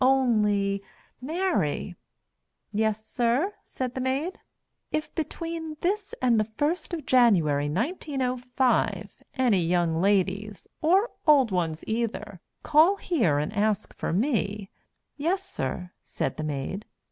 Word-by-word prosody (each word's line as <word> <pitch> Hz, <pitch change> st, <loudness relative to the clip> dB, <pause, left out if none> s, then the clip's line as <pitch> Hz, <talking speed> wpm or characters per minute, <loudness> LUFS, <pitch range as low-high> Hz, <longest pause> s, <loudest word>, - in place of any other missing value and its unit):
Only, 210 Hz, -7 st, +3 dB, 0.4 s
Mary 300 Hz, -, -1 dB, 0.4 s
" -, -, -50 dB
"Yessir?" 235 Hz, -, +1 dB
said 255 Hz, -2 st, -4 dB
the 260 Hz, -, -3 dB
Maid. 275 Hz, +8 st, -1 dB, 0.5 s
"If 310 Hz, 0 st, -2 dB
between 325 Hz, 0 st, -4 dB
this 400 Hz, +3 st, -1 dB
and 240 Hz, -3 st, +3 dB
the 215 Hz, +1 st, 0 dB
first 320 Hz, +7 st, 0 dB
of 325 Hz, -5 st, -4 dB
January, 170 Hz, -, +4 dB
1905, 255 Hz, -, 0 dB, 0.2 s
any 240 Hz, -8 st, +3 dB
young 170 Hz, -1 st, +1 dB
ladies, 200 Hz, +1 st, 0 dB
or 380 Hz, +9 st, +3 dB, 0.2 s
old 275 Hz, -7 st, +6 dB
ones 165 Hz, -3 st, -1 dB
either, 215 Hz, -4 st, -3 dB, 0.2 s
call 315 Hz, +6 st, +5 dB
here 245 Hz, -, +1 dB
and 150 Hz, +7 st, -2 dB
ask 210 Hz, 0 st, 0 dB
for -, -, -3 dB
me 205 Hz, -, 0 dB, 0.2 s
" -, -, -52 dB
"Yessir," 330 Hz, -, -2 dB
said -, -, -3 dB
the 155 Hz, -, -3 dB
Maid. 155 Hz, +7 st, -3 dB
235 Hz, 120 wpm, -27 LUFS, 195-305 Hz, 0.5 s, old